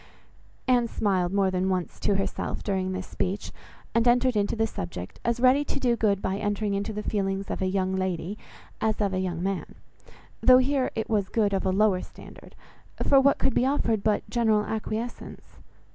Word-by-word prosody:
Anne 245 -2 +3
smiled 190 -6 0
more 195 -1 +2
than 185 +1 0
once 185 -2 -2
to 200 - +1
herself 195 - -3
during 190 -2 -1
this 185 0 -4
speech, 195 +3 -3 0.4
and 230 +1 +2
entered 245 0 +3
into 205 +1 +1
the 225 0 +1
subject, 90 - -6
as 235 0 0
ready 260 +3 +5
to 285 - -4
do 245 -3 +2
good 205 -4 +1
by 190 +1 -1
entering 205 0 -1
into 200 +2 -2
the 210 0 -5
feelings 195 -1 -2
of - - -3
a 190 - +1
young 190 0 0
lady 185 0 -2 0.5
as 220 -1 0
of 200 -2 0
a 185 - 0
young 180 -2 -2
man, 195 -1 -3 0.7
though 255 0 +7
here 260 0 +1
it 220 - -2
was 205 -4 0
good 210 -3 +1
of 195 0 0
a - - +2
lower 195 -1 +3
standard, - - -13 0.5
for 275 - +5
what 280 +1 +4
could 270 - +1
be - - +2
offered 230 -6 +1
but 210 0 0
general 220 -3 +2
acquiescence? 220 +2 -5
205 Hz, 190 wpm, -26 LUFS, 190-230 Hz, 0.7 s, though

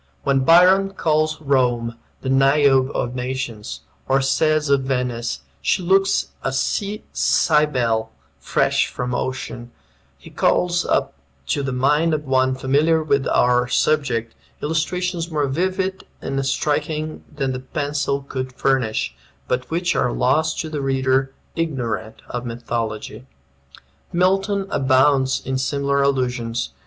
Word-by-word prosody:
When 140 -1 +2
Byron 185 +7 +5
calls 155 -1 +1
Rome 125 -5 +1 0.3
"the 130 - -3
Niobe 135 0 +4
of 120 - -1
nations," 125 -4 -4 0.3
or 135 +1 +3
says 155 +3 +2
of 140 -1 +3
Venice, 125 - -2 0.2
"She 125 - +1
looks 195 +2 +2
a 135 - -1
Sea 200 +10 -2
Cybele 125 -8 +2 0.3
fresh - - +1
from 125 0 -4
ocean," 120 -1 -4 0.5
he - - -14
calls 175 0 +1
up - - 0 0.4
to 145 - +1
the 135 -1 -2
mind 150 +6 +2
of 150 0 -5
one 130 -1 +2
familiar 150 +5 +2
with 140 -3 +1
our 125 0 +3
subject, 125 -5 0 0.3
illustrations 170 +3 -1
more 150 -3 0
vivid 185 +6 -1 0.2
and 135 0 -2
striking 155 +2 -1
than 135 -3 -1
the 130 - -4
pencil 140 0 -2
could 130 -2 -5
furnish, 125 - 0 0.3
but 125 0 -2
which 175 +2 0
are 125 - +1
lost 155 +7 +1
to 160 - -5
the 150 -2 -3
reader 135 0 +1 0.2
ignorant 125 -9 -3
of 120 0 -4
mythology. 115 0 -4 0.8
Milton 195 +3 +1
abounds 130 0 +3
in 130 0 -1
similar 140 +1 0
allusions. 125 - -1
135 Hz, 125 wpm, -21 LUFS, 125-155 Hz, 0.8 s, Byron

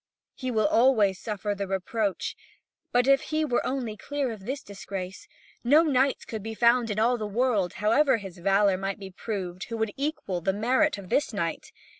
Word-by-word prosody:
He 255 - -5
will 220 -3 +1
always 215 -4 +4
suffer 210 -2 -3
the 200 -1 -4
reproach. 195 +2 -2 0.6
If 265 +3 +4
he 310 0 -1
were 245 -5 0
only 250 -5 -2
clear 280 +2 -3
of 210 -2 -9
this 270 +2 -3
disgrace, 195 -1 -7 0.4
no 290 +7 +6
knight 275 -3 +1
could 220 -2 -5
be 220 +2 -6
found 235 +1 +4
in 210 - -2
all 235 +2 +2
the 215 - -3
world, 210 -4 +1
however 230 +5 +3
his 195 -4 -9
valour 195 +1 +3
might 195 +1 -3
be 195 -2 -9
proved, 185 -2 -5
who 230 - -5
would 220 -2 -1
equal 275 - -2
the 190 +3 +1
merit 255 +7 +2
of 195 -2 -10
this 290 - +1
knight. 170 -5 -3
220 Hz, 185 wpm, -27 LUFS, 195-255 Hz, 0.6 s, no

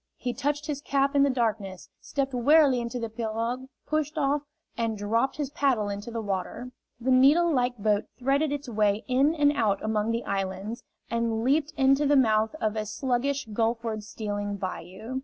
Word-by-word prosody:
He 245 -1 -3
touched 290 +2 -2
his 290 -2 -3
cap 275 0 +1
in 280 - +5
the 280 - +4
darkness, 220 -7 -2
stepped 275 -1 -3
warily 270 +1 +5
into 235 +1 -4
the 230 - -2
pirogue, 230 +3 -3 0.2
pushed 310 0 -1
off, 290 0 +1 0.3
and 225 -2 -1
dropped 225 +6 0
his 285 -2 -3
paddle 255 -8 +1
into 205 +3 -5
the 230 -1 -4
water. 205 +5 -4 0.3
The 255 +2 0
needle 295 +7 +5
like 245 -2 +1
boat 210 0 +1
threaded 275 +4 +1
its 290 -1 -4
way 210 -2 +1
in 275 +5 +3
and 290 -2 +4
out 215 -8 +1
among 215 0 0
the 230 +1 -1
islands, 195 +3 -3 0.3
and 230 -1 0
leaped 290 +4 +2
into 275 +2 +4
the 290 - +4
mouth 220 -1 +3
of 215 0 -1
a 215 -1 -2
sluggish 265 +4 -1
gulfward 225 0 -1
stealing 205 -1 -4
bayou. 195 +6 -5
240 Hz, 175 wpm, -27 LUFS, 215-275 Hz, 0.3 s, in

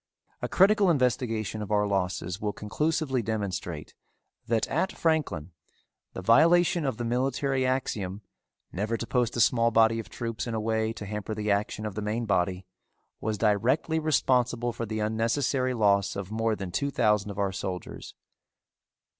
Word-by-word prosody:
A - - -1
critical 200 0 +4
investigation 115 - 0
of 105 - -5
our 105 0 +3
losses 95 -1 -2
will 105 -1 -1
conclusively 150 +4 -1
demonstrate 100 -8 -4 0.5
that 115 -2 +1
at 190 - 0
Franklin 155 - -1 0.6
the 95 - -6
violation 165 - +4
of 130 -5 -1
the 120 - -3
military 130 +2 0
axiom 105 -6 -2 0.5
never 105 +5 -2
to 115 - -4
post 125 -1 0
a - - 0
small 115 0 +4
body 115 0 +4
of 115 - -7
troops 115 0 -4
in 115 - -3
a - - -1
way 110 0 0
to 105 - -7
hamper 105 +1 -4
the 105 -1 -1
action 105 +2 -1
of 105 - -4
the 105 - -4
main 110 +3 -2
body 90 -2 0 0.5
was 110 -1 -2
directly 120 +10 +1
responsible 125 -6 +1
for 115 0 -4
the 110 +1 -3
unnecessary 125 +4 0
loss 100 -3 +2
of 100 0 -5
more 115 0 0
than 95 -3 -6
two 140 +10 -1
thousand 105 -5 +1
of 100 - -7
our 100 -1 0
soldiers. 95 -1 -6
110 Hz, 165 wpm, -27 LUFS, 105-130 Hz, 0.6 s, critical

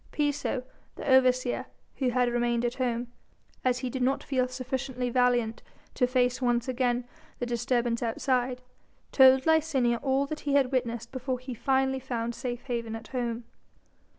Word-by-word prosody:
Piso 290 -3 -1 0.3
the - - -7
overseer 255 -2 +3 0.3
who 260 -2 +1
had 250 0 +2
remained 240 0 +1
at 240 - 0
home, 240 -2 -2 0.5
as 250 -1 +2
he 255 0 -3
did 260 - -3
not 260 +2 +1
feel 255 -2 0
sufficiently 255 0 -3
valiant 245 -2 +2 0.3
to 250 - +2
face 250 0 +1
once 240 0 +1
again 250 -1 0 0.3
the 245 - -2
disturbance 240 0 0
outside, 250 +2 0 0.5
told 265 0 +6
Licinia 285 -7 +2
all 270 0 +1
that 305 +2 -5
he 285 - -2
had 270 -2 +3
witnessed 235 -3 -2
before 260 0 -2
he 255 +1 -7
finally 265 +2 +1
found 235 -2 -3
safe 240 0 -5
haven 235 -3 -3
at 225 0 -9
home. 240 -2 -2
250 Hz, 155 wpm, -28 LUFS, 240-265 Hz, 0.5 s, told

